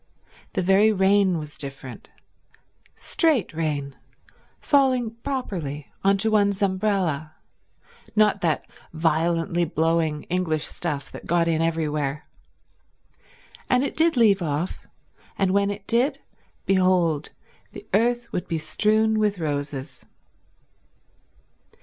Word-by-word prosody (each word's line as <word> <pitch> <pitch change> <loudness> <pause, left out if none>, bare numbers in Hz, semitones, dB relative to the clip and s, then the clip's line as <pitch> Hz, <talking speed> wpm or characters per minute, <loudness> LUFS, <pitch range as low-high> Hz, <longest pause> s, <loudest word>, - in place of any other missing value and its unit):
The 185 - 0
very 195 +4 +5
rain 195 -2 +3
was 150 -2 -8
different— 135 -2 -8 0.9
straight 310 - +1
rain, 145 -4 -2 0.6
falling 260 -5 +2
properly 175 - -4
on 195 0 +4
to 220 +3 0
one's 200 -2 +2
umbrella; 185 -6 0 0.8
not 210 -2 +3
that 160 -3 0 0.3
violently 165 +1 +1
blowing 160 -1 0
English 170 -4 -1
stuff 140 -2 -4
that - - -10
got 170 0 +2
in 165 -1 +1
everywhere. 150 -3 -1 1.4
And 250 +1 +3
it 280 - -3
did 325 -3 +2
leave 205 -5 +4
off; 155 +2 -3 0.5
and 190 -2 +1
when 200 +1 +2
it 200 0 -6
did, 245 +7 +1 0.5
behold 185 -5 +2 0.4
the - - -10
earth 235 +3 +1
would 180 - -3
be 165 - -1
strewn 215 +7 +1
with 210 -2 +1
roses. 145 -4 -4
180 Hz, 110 wpm, -24 LUFS, 155-210 Hz, 1.4 s, very